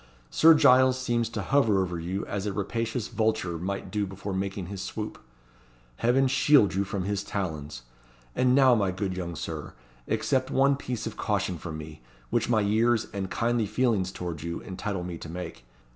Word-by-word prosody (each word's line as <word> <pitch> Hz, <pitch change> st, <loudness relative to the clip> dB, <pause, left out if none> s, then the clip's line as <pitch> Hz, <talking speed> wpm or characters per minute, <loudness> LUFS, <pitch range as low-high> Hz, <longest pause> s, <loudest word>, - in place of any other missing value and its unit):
Sir 165 Hz, 0 st, +7 dB
Giles 130 Hz, -3 st, +5 dB
seems 120 Hz, -3 st, 0 dB
to 105 Hz, -3 st, -4 dB
hover 110 Hz, -3 st, +3 dB
over 90 Hz, -2 st, -1 dB
you 90 Hz, +4 st, -3 dB
as 100 Hz, 0 st, -3 dB
a 100 Hz, -, -2 dB
rapacious 115 Hz, +3 st, -2 dB
vulture 110 Hz, -7 st, -1 dB
might 95 Hz, +1 st, -4 dB
do 105 Hz, 0 st, -1 dB
before 95 Hz, +1 st, -6 dB
making 95 Hz, 0 st, -3 dB
his 95 Hz, +1 st, -6 dB
swoop. 105 Hz, +2 st, -5 dB, 0.8 s
Heaven 130 Hz, +3 st, +3 dB
shield 135 Hz, -4 st, +4 dB
you 95 Hz, +1 st, +1 dB
from 95 Hz, -1 st, -3 dB
his 100 Hz, +1 st, -2 dB
talons! 75 Hz, -11 st, -4 dB, 0.5 s
And 125 Hz, 0 st, +3 dB
now, 135 Hz, -2 st, +6 dB
my 100 Hz, -5 st, +2 dB
good 95 Hz, 0 st, -3 dB
young 85 Hz, -2 st, -4 dB
Sir, 80 Hz, -3 st, -6 dB, 0.3 s
accept 130 Hz, -1 st, 0 dB
one 140 Hz, +1 st, +3 dB
piece 125 Hz, -4 st, -4 dB
of -, -, -6 dB
caution 90 Hz, -3 st, -1 dB
from 80 Hz, -2 st, -6 dB
me, 80 Hz, 0 st, -9 dB, 0.3 s
which -, -, +1 dB
my 110 Hz, -3 st, +3 dB
years 110 Hz, +3 st, +2 dB
and 95 Hz, -2 st, -3 dB
kindly 115 Hz, -2 st, 0 dB
feelings 105 Hz, -4 st, +1 dB
towards 85 Hz, -5 st, -5 dB
you 85 Hz, +1 st, -4 dB
entitle 95 Hz, 0 st, -4 dB
me 85 Hz, -2 st, -6 dB
to 80 Hz, -, -8 dB
make. 85 Hz, -7 st, -7 dB
100 Hz, 180 wpm, -27 LUFS, 90-120 Hz, 0.8 s, Sir